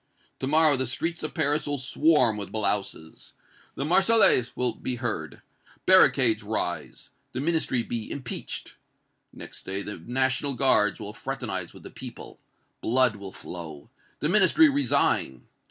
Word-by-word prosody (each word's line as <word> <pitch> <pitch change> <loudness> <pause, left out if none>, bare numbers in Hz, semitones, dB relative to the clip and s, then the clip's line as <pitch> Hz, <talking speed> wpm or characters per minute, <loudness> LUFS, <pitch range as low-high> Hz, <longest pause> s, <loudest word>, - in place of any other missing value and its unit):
To 130 - -3
morrow 155 0 +4
the 130 -1 -1
streets 160 +7 -3
of 155 - -5
Paris 150 -2 0
will 145 0 -2
swarm 130 -2 +2
with 100 -1 -6
blouses! 100 -6 -3 0.4
the 135 - -3
Marseillaise 190 - +4
will 125 -2 +1
be 125 - -4
heard! 120 -2 -5 0.4
barricades 130 - +5
rise! 105 -4 -5 0.2
the 125 - -4
Ministry 150 -5 0
be 115 -2 -5
impeached! 130 -3 -6 0.5
Next - - -9
day 95 +1 -3
the 105 - -6
National 130 - -1
Guards 125 -6 +3
will 105 - -6
fraternize 110 -9 -4
with - - -15
the - - -10
people! - - -10 0.4
blood 125 -1 +2
will 100 -1 -9
flow! 80 -6 -9 0.3
the 150 - +1
Ministry 210 - +5
resign! 280 0 +1
130 Hz, 140 wpm, -26 LUFS, 105-150 Hz, 0.5 s, barricades